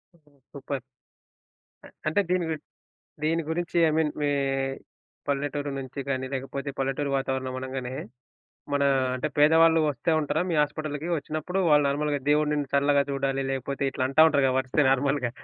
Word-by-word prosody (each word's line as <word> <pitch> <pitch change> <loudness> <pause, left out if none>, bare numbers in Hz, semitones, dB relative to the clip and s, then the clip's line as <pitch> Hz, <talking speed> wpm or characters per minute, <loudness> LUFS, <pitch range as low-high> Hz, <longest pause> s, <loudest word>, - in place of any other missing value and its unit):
ఓహ్! 160 -3 -29 0.3
Super. 140 -1 -5 1.0
అ - - -11 0.2
అంటే 160 +6 +3
దీని 180 -1 +1
గు 160 - 0 0.7
దీని 165 +2 +1
గురించి 175 +1 -2
ఐ - - +3
మీన్ 160 -2 +2
మీ 145 - +1 1.0
పల్లెటూరు 145 +1 -2
నుంచి 135 +1 -7
గాని 130 -1 -1
లేకపోతే 135 +1 -4
పల్లెటూరి 135 +1 -1
వాతావరణం 130 -1 -2
అనంగానే 130 -1 -5 0.8
మన 140 0 +2 0.3
అంటే 130 +4 -2
పేదవాళ్ళు 160 +2 +6
వస్తే 145 +4 -2
ఉంటారా, 150 +1 -1
మీ - - 0
హాస్పిటల్‌కి? 150 0 -4
ఒచ్చినప్పుడు 155 +5 -4
వాళ్ళు 150 -1 +5
నార్మల్‌గా 145 +1 0
దేవుడు 150 0 +3
నిన్ను 145 -2 -1
చల్లగా 140 0 +4
చూడాలి 135 0 -1
లేకపోతే 135 +1 -3
ఇట్లా 130 - -2
అంటా 155 +4 +6
ఉంటారుగా 140 -4 +2
వస్తే 130 +3 +1
నార్మల్‌గా. 135 -1 +1
145 Hz, 150 wpm, -26 LUFS, 135-155 Hz, 1.0 s, పేదవాళ్ళు